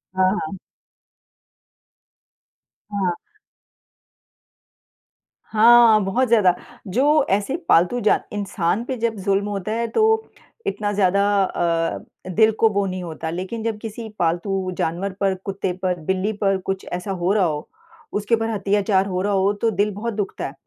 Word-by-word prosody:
हाँ, 185 0 +3 0.2
हाँ। 195 -1 -7 2.4
हाँ। 185 -3 0 2.3
हाँ, 225 0 +6
बहुत 240 +7 +1
ज़्यादा। 210 -6 +4 0.3
जो 280 +8 +3
ऐसे 205 +8 0
पालतू 180 +9 +4
जान 215 - +3
इंसान 200 0 -1
पे 260 -1 -3
जब 230 0 -1
ज़ुल्म 200 0 +2
होता 200 +1 -3
है 230 +1 -1
तो 445 - +2 0.4
इतना 210 - -1
ज़्यादा 200 0 +2 0.2
अ 165 -2 0 0.3
अ, - - -7
दिल 220 0 +5
को 225 - +5
वो 200 -1 0
नहीं 185 -1 -4
होता। 160 -1 -5
लेकिन 185 +7 -4
जब 225 -2 -2
किसी 225 +1 -7
पालतू 185 +3 0
जानवर 180 +4 -2
पर, 195 -1 +1
कुत्ते 190 0 -4
पर, 180 -2 0
बिल्ली 190 +3 0
पर 195 -1 +2
कुछ 195 0 -3
ऐसा 180 +3 -4
हो 180 0 0
रहा 200 -4 +3
हो, 150 -2 -3 0.4
उसके 210 +3 +1
ऊपर 225 0 -2
अत्याचार 200 -1 +1
हो 185 -1 -2
रहा 205 +1 0
हो 195 +1 +2
तो 230 - +3
दिल 205 +2 +1
बहुत 230 +3 -4
दुखता 205 -2 -3
है 135 - -9
200 Hz, 150 wpm, -22 LUFS, 185-220 Hz, 2.4 s, हाँ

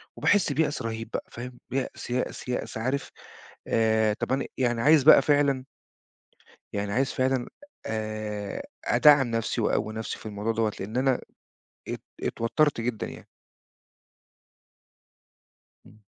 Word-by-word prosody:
وباحس 200 -7 +3
بيأس 150 +1 0
رهيب 115 0 -4
بقى، - - -3
فاهم، 125 +1 -8
بيأس، 130 -2 -3
يأس، 125 +1 -2
يأس، 115 -2 -3
عارف 130 +5 -2 0.6
آآ 110 -1 +3
طب 130 - -3
أنا 135 - 0
يعني 120 -2 +1
عايز 150 -1 +6
بقى 155 - +8
فعلًا 140 -3 +2 1.1
يعني 100 0 -2
عايز 135 +2 +1
فعلًا 130 -1 0 0.4
آآ، 110 -2 -4 0.2
أدعّم 145 -4 +6
نفسي 115 +1 -1
وأقوي 105 0 0
نفسي 110 0 -4
في - - -15
الموضوع 105 +1 -2
دوّة، 110 -1 +1
لأن 105 +6 -4
أنا 130 -1 +2 0.7
ات - - -4 0.2
اتوترت 115 +2 +1
جدًا 115 -3 -2
يعني. - - -11 2.6
إمم. 105 -1 -19
120 Hz, 125 wpm, -27 LUFS, 110-135 Hz, 2.6 s, بقى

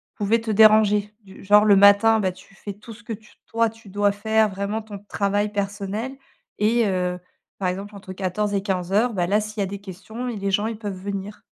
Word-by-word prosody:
pouvaient 215 +2 +1
te 225 -1 -3
déranger? 210 -1 +5
Du 190 -1 -14
genre, 210 +2 +5
le 205 - +6
matin, 205 +3 +6
bah, 190 -3 0
tu 185 - -18
fais 205 0 -7
tout 215 +3 -12
ce 235 +2 -16
que 225 - -5
tu 215 +1 -13
toi, 230 0 +1
tu 225 -2 -16
dois 205 +1 +2
faire 220 +1 +1
vraiment 200 +3 -3
ton 205 -2 -9
travail 205 +1 -1
personnel 205 +5 -3 0.4
et 225 +2 +3
heu, 180 -1 -1 0.4
par 185 -2 -1
exemple, 200 +3 -6
entre 190 -1 -9
14:00 200 +2 -2
et 195 - +1
15:00, 195 +4 0
bah, 180 -3 0
là 210 +3 +2
s'il 215 0 -7
y - - +2
a - - 0
des 200 +1 -6
questions 215 +6 -7
et 235 - -3
les 200 -1 -2
gens, 205 +3 +1
ils 225 -2 -4
peuvent 205 -3 -5
venir. 200 +2 -6
205 Hz, 225 wpm, -23 LUFS, 195-220 Hz, 0.4 s, le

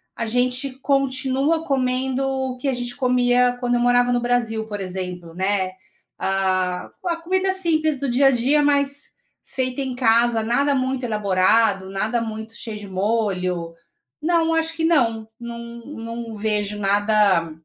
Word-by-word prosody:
a 230 - -3
gente 250 +3 0
continua 275 +3 +1
comendo 260 -1 0
o 265 -1 -2
que 275 - -4
a 265 - +1
gente 245 0 -4
comia 250 -1 +2
quando 245 -1 0
eu 240 - +2
morava 245 0 +3
no 245 - +1
Brasil, 230 -3 0
por 205 -1 -5
exemplo, 180 -3 -5
né. 190 0 0 0.5
Ah, 185 -1 0 0.2
a 340 - +1
comida 375 +3 0
simples 315 -6 +1
do 280 - -2
dia 255 +3 +4
a 270 - +6
dia, 265 +5 +2
mas 280 -1 +1 0.3
feita 255 +1 -3
em 260 -2 -3
casa, 230 -2 +3
nada 280 +5 +2
muito 260 0 -1
elaborado, 200 -2 +2
nada 215 +5 -1
muito 220 0 -6
cheio 220 -2 -6
de 205 -1 -9
molho. 185 -4 -1 0.5
Não, 330 0 +2
acho 325 0 0
que 320 -1 0
não. 230 -9 +2
Não 235 0 -7 0.3
não 230 -4 -7
vejo 210 -1 -1
nada 200 -4 +2
245 Hz, 155 wpm, -22 LUFS, 210-270 Hz, 0.5 s, a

